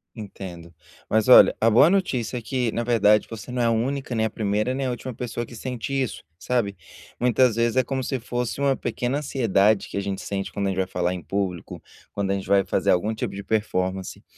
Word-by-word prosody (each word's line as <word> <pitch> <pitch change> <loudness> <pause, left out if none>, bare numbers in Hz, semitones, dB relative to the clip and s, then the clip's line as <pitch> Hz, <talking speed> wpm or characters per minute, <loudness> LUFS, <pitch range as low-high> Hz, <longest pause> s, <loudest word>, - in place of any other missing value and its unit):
Entendo. 90 -5 -9 0.4
Mas 110 +1 +2
olha, 125 - +8
a 115 - +4
boa 145 +9 +6
notícia 130 - 0
é - - -5
que 120 0 -1
na 120 - -2
verdade 105 -3 +3
você 115 +2 -8
não 125 -1 -1
é - - +2
a 115 - +3
única 130 +3 -1
nem 110 -1 +1
a - - -6
primeira 105 +3 -1
nem 135 0 -2
a 125 - -1
última 125 +2 -5
pessoa 120 0 -4
que 120 - -11
sente 125 +2 -5
isso, 135 -3 -2
sabe. 105 -2 -1 0.4
Muitas 125 -1 +3
vezes 115 +1 +1
é 130 - +5
como 130 +1 -3
se 130 -1 -2
fosse 120 +2 -3
uma 135 -1 +3
pequena 120 +3 -2
ansiedade 110 -7 +1
que - - -5
a - - 0
gente 100 -1 -4
sente 100 -1 -4
quando 100 -1 -1
a - - +1
gente 95 - -3
vai 95 - +1
falar 90 0 -1
em 90 - -6
público, 95 -4 -4 0.3
quando 100 -1 -2
a 100 - +1
gente 95 - -5
vai 100 0 +4
fazer - - +1
algum 100 +5 +1
tipo - - -4
de 100 0 -6
performance. 95 -3 -2
110 Hz, 230 wpm, -24 LUFS, 100-125 Hz, 0.4 s, olha